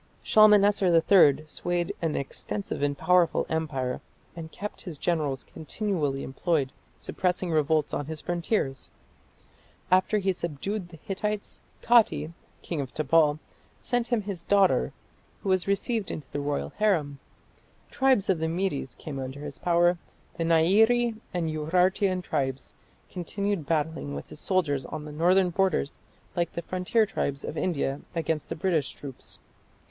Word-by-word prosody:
Shalmaneser 205 -2 +5
III 165 -3 +5
swayed 175 +2 -2
an 165 -3 0
extensive 195 +8 -4
and 145 0 0
powerful 175 +2 +3
empire, 135 -6 -2 0.3
and 160 -1 -8
kept 210 +1 -6
his 175 -6 -7
generals 150 -5 -1
continually 160 -5 -2
employed 140 -1 -1 0.3
suppressing 180 -1 -2
revolts 155 -1 +1
on 145 - -2
his 160 -1 -5
frontiers. 170 -5 -2 1.0
After 185 +3 +4
he 195 -2 +1
subdued 175 +4 -4
the 165 - -12
Hittites, 205 +4 -4 0.2
Kati, 230 -9 +4 0.3
king 165 -4 -3
of 130 -2 -7
Tabal, 155 0 +3 0.4
sent 245 -1 -1
him 235 -4 0
his 195 -4 -5
daughter, 190 - +3 0.5
who 195 - -2
was 185 -1 +2
received 200 +1 0
into 150 - -5
the 145 - -3
royal 145 0 -2
harem. 160 -10 +1 0.7
Tribes 260 -7 +3
of 185 -4 +2
the 160 - 0
Medes 165 -7 -2
came 140 -3 -7
under 130 +2 -6
his 145 -2 -7
power: 175 0 +3 0.4
the 170 - -2
Nairi 220 +9 +4 0.2
and 175 -2 -1
Urartian 180 +4 +1
tribes 135 -5 -2 0.4
continued 195 -2 -3
battling 160 -2 -1
with - - -7
his - - -9
soldiers 155 -9 0
on 150 +4 -6
his 150 - -8
northern 180 +3 +3
borders 185 -5 0 0.4
like 170 -2 -1
the 170 - -4
frontier 185 +6 +1
tribes 140 -9 -3
of - - -5
India 145 -5 -1
against 160 -2 -2
the - - -3
British 160 -5 0
troops. 135 -3 -10
170 Hz, 140 wpm, -27 LUFS, 150-195 Hz, 1.0 s, Shalmaneser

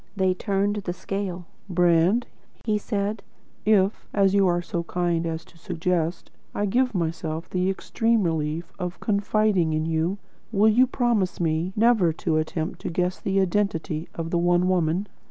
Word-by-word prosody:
They 190 -2 +2
turned 200 +2 0
the 190 -4 -3
scale. 185 -2 -4 0.2
"Brand," 175 +5 +3 0.4
he 215 -2 +1
said, 205 0 -2 0.5
"if, 205 -1 +3
as 195 -2 +4
you 200 -1 +4
are 175 -1 +2
so 170 0 -3
kind 170 -1 0
as 160 0 -4
to 170 - -21
suggest, 170 0 -2 0.2
I 205 - 0
give 245 +3 +1
myself 165 -1 -2
the 185 0 0
extreme 225 +3 +1
relief 160 0 -2
of 180 -1 -4
confiding 200 -5 +1
in 155 0 0
you, 165 +4 0 0.3
will 215 0 +4
you 250 +4 +5
promise 235 -7 0
me 165 +1 0
never 220 -6 +4
to 160 -1 -1
attempt 160 +1 -2
to - - -3
guess 180 +2 -1
at - - -30
the 195 0 +2
identity 175 -4 -1
of 165 0 -4
the 170 - +2
One 175 +1 +3
Woman?" 180 +1 +1
180 Hz, 165 wpm, -25 LUFS, 165-205 Hz, 0.5 s, you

